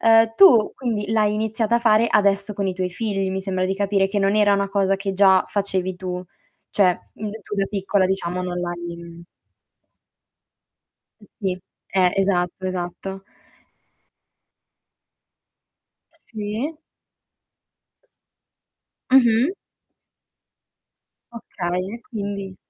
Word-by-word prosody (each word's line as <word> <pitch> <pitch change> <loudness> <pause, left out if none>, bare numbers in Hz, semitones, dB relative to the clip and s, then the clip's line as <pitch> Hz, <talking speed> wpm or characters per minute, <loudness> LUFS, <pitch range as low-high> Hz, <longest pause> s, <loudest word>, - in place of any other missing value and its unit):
Uhm, 225 0 +5
tu 235 - +6
quindi 220 -5 -3
l'hai 215 -1 +2
iniziata 220 +1 0
a - - +2
fare 230 -1 +4
adesso 200 0 +2
con 200 -1 -2
i 190 - -2
tuoi 185 0 -2
figli 195 -1 -2
mi 190 0 -2
sembra 185 -1 -2
di 190 - -1
capire, 195 -1 +1
che 205 +1 -1
non 195 +1 +2
era 200 -1 +3
cosa 195 -1 +1
che 195 0 -3
già 190 -1 +5
facevi 190 -2 -1
tu, 180 0 -5 0.5
cioè, 185 -3 +1
mhmm, 215 0 -5
d 220 +1 -9
tu - - -6
da 195 -1 0
piccola 195 -1 +1
diciamo 180 -1 -1
non 180 -1 -3
l'hai 170 -1 -7 2.2
Sì. 185 -2 -2 0.3
Eh, 185 -2 +2
esatto, 185 -1 0
esatto. 185 +1 -5 2.9
Sì. 230 +1 -5 2.4
Mh-mh. 245 +3 +5 1.8
Okay 185 -4 -4
e 235 - -9
quindi 200 -6 -6
195 Hz, 110 wpm, -22 LUFS, 185-215 Hz, 2.9 s, tu